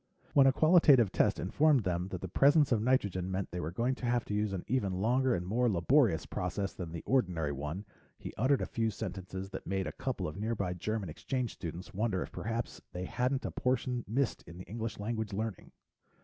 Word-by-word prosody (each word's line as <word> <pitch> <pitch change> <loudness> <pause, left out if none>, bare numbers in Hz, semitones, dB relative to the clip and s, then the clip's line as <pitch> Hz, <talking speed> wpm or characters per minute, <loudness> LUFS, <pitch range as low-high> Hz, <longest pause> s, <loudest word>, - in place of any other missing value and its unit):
When 135 -1 +7
a - - +7
qualitative 145 - +5
test - - +2
informed 145 - +3
them 90 -1 -1
that 90 -2 -6
the 95 - -4
presence 145 - +4
of 110 -3 +3
nitrogen 100 -7 +1
meant 95 0 -3
they 90 - -4
were 80 - -3
going 115 +9 0
to 125 - -4
have 120 0 +1
to - - -4
use 105 0 0
an 95 -3 -3
even 110 -7 0
longer 125 +7 +2
and 90 - -3
more 120 +6 +2
laborious 105 - +3
process 95 +2 -3
than 85 -3 -6
the 85 -1 -6
ordinary 90 - +1
one, 75 +8 -5 0.3
he - - -8
uttered 130 +5 +2
a - - -1
few 115 -1 -1
sentences 95 -2 -6
that - - -7
made 95 0 -1
a - - -3
couple - - -3
of 75 - -7
nearby 105 -4 -1
German 105 +3 -3
exchange 125 - -3
students 85 +1 -7
wonder 100 -2 0
if - - -10
perhaps 115 +1 -4
they 90 +1 -4
hadn't 130 +6 -1
a - - -2
portion 125 -1 -1
missed 125 +5 0
in 85 - -10
the 90 - -8
English 115 +2 -5
language 110 0 -3
learning. 110 -1 -4
105 Hz, 210 wpm, -32 LUFS, 90-125 Hz, 0.3 s, When